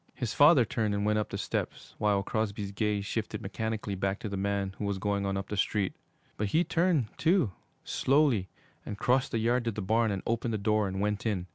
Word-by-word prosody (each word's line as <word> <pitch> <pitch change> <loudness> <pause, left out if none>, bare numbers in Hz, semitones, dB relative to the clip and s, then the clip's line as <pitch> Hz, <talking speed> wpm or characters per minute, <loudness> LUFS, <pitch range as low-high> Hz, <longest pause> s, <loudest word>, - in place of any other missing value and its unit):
His 120 -4 -3
father 145 -4 +6
turned 110 -4 -1
and 100 0 -1
went 105 0 +2
up 105 - -2
the - - -4
steps, - - -4
while 100 -2 +2
Crosby's 105 -2 -2
gaze 105 0 -1
shifted 110 0 -3
mechanically 110 0 -3
back 95 +1 -1
to 110 - -4
the 100 - -4
man 100 0 -1
who 105 - -2
was 100 -1 -1
going 100 +1 -1
on 95 0 -1
up 95 0 -5
the 105 - -2
street. 100 -1 0 0.4
But 105 - 0
he 160 - +3
turned, 170 -10 +1
too, 160 - +3 0.3
slowly, 135 -9 +2 0.3
and 105 - -6
crossed 125 +4 +2
the - - 0
yard 120 +2 +1
to 115 - +1
the 105 - -5
barn 110 +3 +2
and 100 -2 -3
opened 115 0 -1
the - - 0
door 105 0 +1
and 95 0 -3
went 105 +1 -1
in. 95 -5 -1
105 Hz, 225 wpm, -29 LUFS, 100-115 Hz, 0.4 s, father